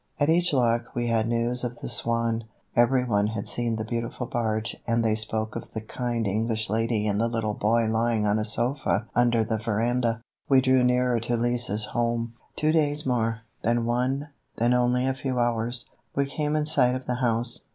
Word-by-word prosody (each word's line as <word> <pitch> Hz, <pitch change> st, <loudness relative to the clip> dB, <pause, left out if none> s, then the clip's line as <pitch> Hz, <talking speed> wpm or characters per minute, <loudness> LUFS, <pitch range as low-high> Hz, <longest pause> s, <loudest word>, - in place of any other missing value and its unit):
At 145 Hz, +1 st, +2 dB
each 175 Hz, +1 st, +4 dB
lock 120 Hz, -3 st, +1 dB
we 120 Hz, 0 st, -1 dB
had 115 Hz, -1 st, +1 dB
news 120 Hz, +1 st, 0 dB
of 120 Hz, -1 st, -4 dB
the -, -, -7 dB
Swan; 115 Hz, -1 st, -1 dB, 0.3 s
every 125 Hz, +2 st, +4 dB
one 105 Hz, -4 st, +1 dB
had 110 Hz, -2 st, -4 dB
seen 120 Hz, -1 st, +2 dB
the 110 Hz, 0 st, -3 dB
beautiful 115 Hz, +2 st, -3 dB
barge 110 Hz, -2 st, -1 dB
and 115 Hz, 0 st, +1 dB
they 110 Hz, -, +3 dB
spoke 110 Hz, 0 st, 0 dB
of 115 Hz, -, -7 dB
the 110 Hz, -, -4 dB
kind 120 Hz, +1 st, -3 dB
English 110 Hz, +1 st, -1 dB
lady 115 Hz, -1 st, 0 dB
and 105 Hz, 0 st, 0 dB
the 115 Hz, -, +2 dB
little 115 Hz, -2 st, -1 dB
boy 115 Hz, +3 st, +2 dB
lying 110 Hz, 0 st, +1 dB
on 105 Hz, +1 st, +2 dB
a -, -, 0 dB
sofa 120 Hz, 0 st, +1 dB
under 120 Hz, -2 st, +3 dB
the 110 Hz, 0 st, -2 dB
veranda. 115 Hz, +1 st, 0 dB, 0.3 s
We 135 Hz, -1 st, +6 dB
drew 130 Hz, -1 st, +3 dB
nearer 125 Hz, -1 st, +2 dB
to 120 Hz, +1 st, -1 dB
Lise's 120 Hz, -3 st, 0 dB
home, 115 Hz, -1 st, -1 dB, 0.2 s
two 155 Hz, +1 st, +1 dB
more 160 Hz, -, +5 dB
days, 145 Hz, -1 st, -1 dB, 0.5 s
then 120 Hz, 0 st, +1 dB
one, 130 Hz, +5 st, -1 dB, 0.3 s
then 120 Hz, +2 st, +2 dB
only 125 Hz, +1 st, +2 dB
a 135 Hz, -, +1 dB
few 130 Hz, -1 st, -3 dB
hours. 120 Hz, 0 st, 0 dB, 0.3 s
We 140 Hz, -, +2 dB
came 150 Hz, +2 st, -2 dB
in 150 Hz, -1 st, +1 dB
sight 125 Hz, -5 st, +3 dB
of 130 Hz, -, -6 dB
the 125 Hz, -, -2 dB
house. 120 Hz, 0 st, 0 dB
120 Hz, 195 wpm, -26 LUFS, 110-125 Hz, 0.5 s, We